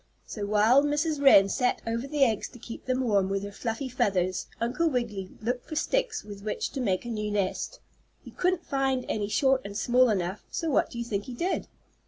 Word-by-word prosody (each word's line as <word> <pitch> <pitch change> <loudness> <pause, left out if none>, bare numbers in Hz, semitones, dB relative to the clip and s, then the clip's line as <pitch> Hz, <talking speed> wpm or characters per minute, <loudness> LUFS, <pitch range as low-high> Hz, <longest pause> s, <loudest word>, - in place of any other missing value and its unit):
So 205 -2 -5
while 215 +6 +5
Mrs. 295 +1 0
Wren 200 -8 +8
sat 250 +5 0
over 230 +3 -2
the 290 0 +2
eggs 220 -4 -1
to - - -14
keep 230 0 -9
them 255 0 0
warm 200 -6 +2
with 195 0 -1
her 205 - -5
fluffy 225 +5 -3
feathers, 185 -7 0
Uncle 250 +9 +1
Wiggily 215 -8 -2
looked 245 +2 -2
for 310 - -4
sticks - - 0
with 205 -1 -9
which 210 +1 -3
to 270 - -4
make 195 -3 0
a - - -5
new 210 -2 -2
nest. 205 - -2 0.4
He - - -11
couldn't 360 -1 0
find 270 -2 0
any 205 -2 -1
short 265 +4 +2
and 200 0 -6
small 250 +2 +4
enough, 190 -1 -1
so 330 -2 -2
what - - +2
do - - -9
you 235 - -3
think 205 -3 -3
he 250 - -7
did? 350 +9 -1
235 Hz, 215 wpm, -28 LUFS, 205-270 Hz, 0.4 s, Wren